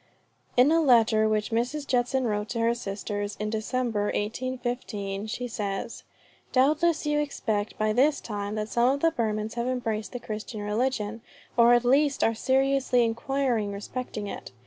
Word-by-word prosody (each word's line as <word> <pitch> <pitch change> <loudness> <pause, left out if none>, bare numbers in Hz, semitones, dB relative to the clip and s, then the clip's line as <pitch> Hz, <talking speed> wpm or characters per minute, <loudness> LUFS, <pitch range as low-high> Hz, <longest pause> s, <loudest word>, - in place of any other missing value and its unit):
In 255 +5 +6
a 330 0 +4
letter 225 -6 +4
which 215 0 0
Mrs. 250 +6 -1
Judson 255 0 +1
wrote 210 -1 -1
to 235 - -3
her 230 +1 +3
sisters 205 -2 -4
in 210 0 -2
December, 225 -1 -1
1815, 220 -3 -3
she 245 +3 -4
says: 205 -1 -4 0.5
"Doubtless 305 +5 +3
you 295 0 +1
expect 220 -8 -2
by 215 0 +1
this 280 +5 +3
time 205 -1 -4
that 210 0 -2
some 240 +2 +3
of 280 +1 0
the 330 - +4
Burmans 220 -5 -2
have 235 +1 -2
embraced 225 -4 -2
the 245 - -4
Christian 215 -1 -6
religion, 220 0 -1 0.3
or 235 0 +6
at 240 0 +1
least 280 +3 +3
are 225 - +3
seriously 265 0 +2
inquiring 235 -2 0
respecting 210 +1 -5
it." 200 - -7
235 Hz, 160 wpm, -27 LUFS, 215-260 Hz, 0.5 s, In